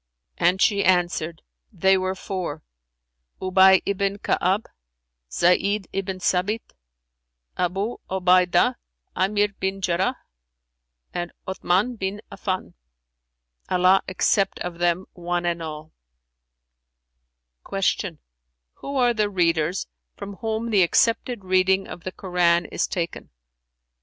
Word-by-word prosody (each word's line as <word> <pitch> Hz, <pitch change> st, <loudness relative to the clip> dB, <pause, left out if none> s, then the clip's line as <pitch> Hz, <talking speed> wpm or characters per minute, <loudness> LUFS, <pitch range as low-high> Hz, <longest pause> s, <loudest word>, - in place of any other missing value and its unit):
And 180 Hz, +2 st, +3 dB
she 200 Hz, 0 st, +3 dB
answered 175 Hz, -3 st, +1 dB, 0.3 s
"They 190 Hz, -1 st, +3 dB
were 185 Hz, 0 st, -1 dB
four, 180 Hz, -6 st, -5 dB, 0.8 s
Ubay 190 Hz, 0 st, +5 dB
ibn 200 Hz, 0 st, -1 dB
Ka'ab, 195 Hz, +1 st, 0 dB, 0.7 s
Zayd 195 Hz, -, +2 dB
ibn 195 Hz, -1 st, -3 dB
Sαbit, 190 Hz, +5 st, -1 dB, 0.8 s
Abϊ 195 Hz, +6 st, -2 dB
Obaydah 185 Hz, +5 st, +3 dB, 0.4 s
'Aamir 205 Hz, +2 st, +1 dB
bin 190 Hz, 0 st, -2 dB
Jarrαh, 190 Hz, +6 st, 0 dB, 1.0 s
and 175 Hz, -1 st, -3 dB, 0.2 s
Othmαn 190 Hz, +5 st, 0 dB
bin 195 Hz, +2 st, -3 dB
Affαn[FN#377] 185 Hz, -, -4 dB, 1.0 s
(Allah 185 Hz, +1 st, +4 dB
accept 195 Hz, +1 st, +1 dB
of 175 Hz, -1 st, -5 dB
them 175 Hz, +1 st, +1 dB
one 175 Hz, 0 st, -2 dB
and 170 Hz, -1 st, -1 dB
all!)" 155 Hz, -1 st, -7 dB, 1.8 s
Q 195 Hz, -3 st, -1 dB, 0.6 s
"Who 280 Hz, -, -6 dB
are 245 Hz, -2 st, +3 dB
the 210 Hz, -2 st, +1 dB
readers, 170 Hz, -2 st, +1 dB, 0.3 s
from 200 Hz, -1 st, -8 dB
whom 225 Hz, 0 st, -3 dB
the 200 Hz, -3 st, +4 dB
accepted 230 Hz, +4 st, +1 dB
reading 185 Hz, +1 st, +2 dB
of 170 Hz, -, -10 dB
the 185 Hz, -, -3 dB
Koran 175 Hz, -2 st, +1 dB
is -, -, -2 dB
taken?" 170 Hz, -2 st, -4 dB
185 Hz, 105 wpm, -24 LUFS, 175-200 Hz, 1.8 s, Ubay